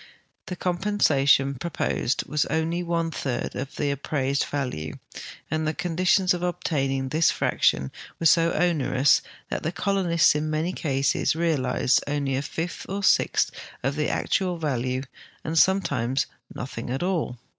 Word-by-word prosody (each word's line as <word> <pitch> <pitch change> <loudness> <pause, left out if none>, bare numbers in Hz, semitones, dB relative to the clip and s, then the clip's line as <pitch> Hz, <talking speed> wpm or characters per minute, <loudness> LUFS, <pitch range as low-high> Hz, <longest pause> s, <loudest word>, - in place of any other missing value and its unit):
The 180 - -4
compensation 175 -8 +2
proposed 135 -2 -2
was 150 +1 0
only 160 +2 -1
one 170 -1 -1
third 130 -5 -3
of 135 +2 -5
the 145 -1 0
appraised 140 0 -1
value, 125 - -4 0.6
and 155 0 0
the 155 - -1
conditions 180 +1 +2
of 175 - -3
obtaining 135 -6 -1
this 155 +4 +3
fraction 65 - +1 0.3
were 165 - -3
so 165 +1 +5
onerous 145 -5 +3 0.3
that - - -2
the 160 - -2
colonists 185 -4 +2
in 150 +1 -2
many 155 +4 -1
cases 140 -2 0
realized 140 -6 +1
only 140 -2 -1
a 135 - 0
fifth 165 +4 -5
or 200 +1 -2
a - - -9
sixth 190 - +3 0.3
of 135 +2 0
the 150 0 0
actual 180 -2 0
value, 130 -4 -1 0.4
and 160 +1 +1
sometimes 135 -10 +2 0.3
nothins: 120 -2 -6
at 135 +6 -2
all. 170 -9 -1
155 Hz, 145 wpm, -25 LUFS, 135-175 Hz, 0.6 s, so